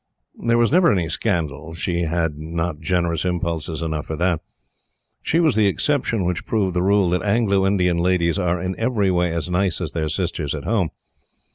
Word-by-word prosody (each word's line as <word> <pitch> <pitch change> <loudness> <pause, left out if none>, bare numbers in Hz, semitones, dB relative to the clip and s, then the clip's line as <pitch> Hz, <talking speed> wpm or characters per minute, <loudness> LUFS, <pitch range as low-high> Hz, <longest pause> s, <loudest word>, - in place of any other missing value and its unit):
There 115 0 +3
was 120 0 +3
never 175 +2 +5
any 90 -5 0
scandal 80 - -2
she 85 0 -1
had 80 -1 -1
not 80 +1 -3
generous 85 0 0
impulses 85 -3 -2
enough 80 -2 -3
for 80 - -3
that. 85 0 0 0.8
She 165 - +1
was 160 -5 +3
the 105 -2 +3
exception 115 -2 0
which 90 -1 -1
proved 100 -5 0
the 90 - 0
rule 95 -1 +3
that 90 - +1
Anglo 100 -2 +2
Indian 90 -3 +2
ladies 85 +1 +1
are 90 -1 0
in 90 +2 -2
every 110 -5 +1
way 90 -1 +1
as 85 0 -2
nice 90 -1 +1
as 85 -4 -4
their 80 -2 -1
sisters 80 -3 -2
at 70 - -6
Home. 100 -6 0
90 Hz, 185 wpm, -21 LUFS, 80-100 Hz, 0.8 s, never